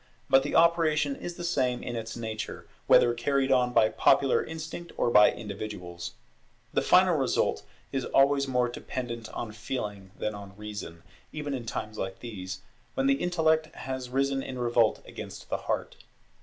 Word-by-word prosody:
But 135 Hz, 0 st, +7 dB
the -, -, -3 dB
operation 160 Hz, -4 st, +4 dB
is 175 Hz, +4 st, -6 dB
the 175 Hz, -, -7 dB
same 130 Hz, -8 st, 0 dB
in 120 Hz, -, -4 dB
its 115 Hz, 0 st, -5 dB
nature, 110 Hz, -2 st, -5 dB, 0.2 s
whether 120 Hz, -, +6 dB
carried 135 Hz, +3 st, +1 dB
on 125 Hz, -1 st, +3 dB
by 110 Hz, -3 st, +5 dB
popular 135 Hz, -2 st, +3 dB
instinct 160 Hz, +2 st, -7 dB
or 120 Hz, -, +2 dB
by 105 Hz, -2 st, +7 dB
individuals. 100 Hz, -5 st, -6 dB, 0.6 s
The -, -, +2 dB
final -, -, +5 dB
result -, -, +1 dB, 0.3 s
is 135 Hz, -1 st, -1 dB
always 140 Hz, 0 st, +3 dB
more 125 Hz, -2 st, +2 dB
dependent 120 Hz, -2 st, -5 dB
on 115 Hz, -, -5 dB
feeling 105 Hz, -3 st, -5 dB
than 105 Hz, -, -2 dB
on 100 Hz, -1 st, -10 dB
reason, 105 Hz, -6 st, -7 dB, 0.3 s
even 150 Hz, -2 st, -4 dB
in 120 Hz, -3 st, -5 dB
times 110 Hz, -1 st, -4 dB
like 95 Hz, 0 st, -3 dB
these, 95 Hz, -5 st, -7 dB, 0.3 s
when 135 Hz, -, +1 dB
the 135 Hz, 0 st, +3 dB
intellect 160 Hz, -3 st, +2 dB
has 130 Hz, -1 st, -5 dB
risen 135 Hz, +1 st, +1 dB
in 130 Hz, -1 st, -6 dB
revolt 120 Hz, -2 st, +2 dB
against -, -, -9 dB
the -, -, +1 dB
heart. -, -, -1 dB
125 Hz, 165 wpm, -28 LUFS, 110-140 Hz, 0.6 s, But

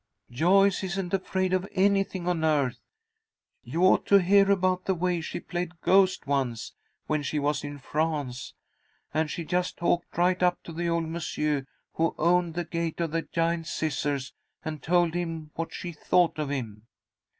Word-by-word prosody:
"Joyce 190 Hz, +9 st, +3 dB
isn't 190 Hz, 0 st, -3 dB
afraid 185 Hz, -1 st, 0 dB
of 185 Hz, +1 st, 0 dB
anything 195 Hz, -2 st, +1 dB
on 175 Hz, -3 st, 0 dB
earth. 145 Hz, -5 st, +1 dB, 0.8 s
You 170 Hz, +3 st, -2 dB
ought 185 Hz, -, +4 dB
to 200 Hz, -, +5 dB
hear 195 Hz, +2 st, +4 dB
about 185 Hz, -2 st, +2 dB
the 190 Hz, -, +1 dB
way 175 Hz, 0 st, 0 dB
she 160 Hz, -, -5 dB
played 175 Hz, -1 st, -5 dB
ghost 190 Hz, -1 st, +3 dB
once, 135 Hz, -5 st, -1 dB, 0.3 s
when 155 Hz, -1 st, 0 dB
she 145 Hz, +2 st, -2 dB
was 145 Hz, +1 st, 0 dB
in 145 Hz, 0 st, -6 dB
France. 145 Hz, -3 st, -3 dB, 0.6 s
And 155 Hz, 0 st, +1 dB
she 170 Hz, 0 st, -4 dB
just 180 Hz, +2 st, -1 dB
talked 175 Hz, -1 st, -1 dB
right 180 Hz, +1 st, +2 dB
up 180 Hz, 0 st, +2 dB
to 165 Hz, -, -9 dB
the 170 Hz, +1 st, -2 dB
old 170 Hz, -1 st, 0 dB
monsieur 150 Hz, -4 st, -2 dB, 0.3 s
who 165 Hz, +1 st, 0 dB
owned 170 Hz, 0 st, +2 dB
the 175 Hz, 0 st, -2 dB
Gate 170 Hz, 0 st, -3 dB
of 165 Hz, -2 st, -1 dB
the 165 Hz, +1 st, 0 dB
Giant 165 Hz, 0 st, -1 dB
Scissors, 145 Hz, -4 st, -2 dB, 0.3 s
and 155 Hz, -1 st, -4 dB
told 175 Hz, -1 st, +2 dB
him 165 Hz, -3 st, -4 dB
what 165 Hz, 0 st, -4 dB
she 175 Hz, -, -6 dB
thought 170 Hz, +1 st, +1 dB
of 150 Hz, -2 st, -2 dB
him." 115 Hz, -6 st, -5 dB
170 Hz, 170 wpm, -27 LUFS, 155-180 Hz, 0.8 s, to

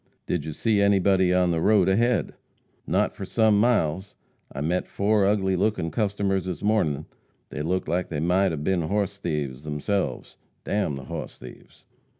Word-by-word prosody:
"Did 80 Hz, -4 st, -2 dB
you 80 Hz, -, -5 dB
see 105 Hz, +4 st, +1 dB
anybody 95 Hz, -2 st, +3 dB
on 90 Hz, -1 st, +3 dB
the 80 Hz, -1 st, 0 dB
road 100 Hz, -1 st, +4 dB
ahead?" 115 Hz, +5 st, +1 dB, 0.5 s
"Not -, -, +1 dB
for -, -, -8 dB
sum 110 Hz, +1 st, +2 dB
miles. 100 Hz, -5 st, +1 dB, 0.4 s
I 70 Hz, -, -7 dB
met 85 Hz, +5 st, -1 dB
four 100 Hz, 0 st, +2 dB
ugly 95 Hz, -2 st, +1 dB
lookin' 95 Hz, -4 st, 0 dB
customers 100 Hz, -3 st, -1 dB
this 95 Hz, +1 st, -5 dB
mornin'. 105 Hz, -10 st, +1 dB, 0.4 s
They 75 Hz, -, -5 dB
looked 90 Hz, +4 st, -1 dB
like 90 Hz, +3 st, -1 dB
they 75 Hz, -, -3 dB
might 90 Hz, +4 st, +2 dB
'a 80 Hz, -, -3 dB
been 85 Hz, +4 st, 0 dB
hoss 100 Hz, 0 st, -1 dB
thieves 75 Hz, -6 st, -3 dB
theirselves. 75 Hz, +7 st, -3 dB, 0.3 s
D -, -, -6 dB
n 100 Hz, -8 st, 0 dB
the 70 Hz, -, -8 dB
hoss -, -, -7 dB
thieves!" 60 Hz, 0 st, -14 dB
95 Hz, 170 wpm, -25 LUFS, 80-100 Hz, 0.5 s, road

